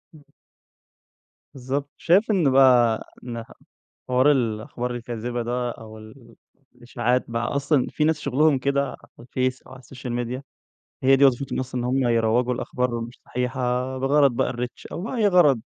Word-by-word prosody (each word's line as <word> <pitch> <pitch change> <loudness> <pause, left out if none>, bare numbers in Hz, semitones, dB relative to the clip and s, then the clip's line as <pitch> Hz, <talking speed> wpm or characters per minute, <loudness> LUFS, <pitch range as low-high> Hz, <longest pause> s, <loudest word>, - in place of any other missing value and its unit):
إمم. 150 - -16 1.3
بالضبط، 135 +2 -4
شايف 195 +6 +3
إنّ 175 -9 +3
بقى 125 -4 +5 0.2
إنها 115 -2 -6 0.6
حوار 130 +3 +4
ال 145 - +4
الأخبار 120 +1 -3
الكاذبة 120 0 -4
ده، 120 +1 -2
أو 110 -1 -10
ال 115 +2 -15 0.4
الإشاعات 120 +1 -1
بقى، 115 0 -2
أصلًا 140 -1 +1
في 150 - 0
ناس 155 0 +1
شُّغلهُم 145 +1 +2
كده 140 +1 +1
على - - -8 0.2
الفيس 130 +2 -2
أو - - -18
على 130 - -11
السوشيال 125 0 -8
ميديا 120 +2 -3 0.6
هي 135 +1 +5
دي 140 - +4
وظيفتهم 135 0 +2
أصلًا 125 -1 -4
إن - - -3
هُم 130 0 +1
يروّجوا 115 +2 +2
الأخبار 125 -1 -2
مش 115 +1 -9
صحيحة، 125 +1 -3 0.4
بغرض 140 +1 +4
بقى - - 0
الrReach 125 0 -6
أو - - -5
بأي 225 +1 0
غرض، 150 - +4
125 Hz, 160 wpm, -24 LUFS, 120-140 Hz, 1.3 s, بقى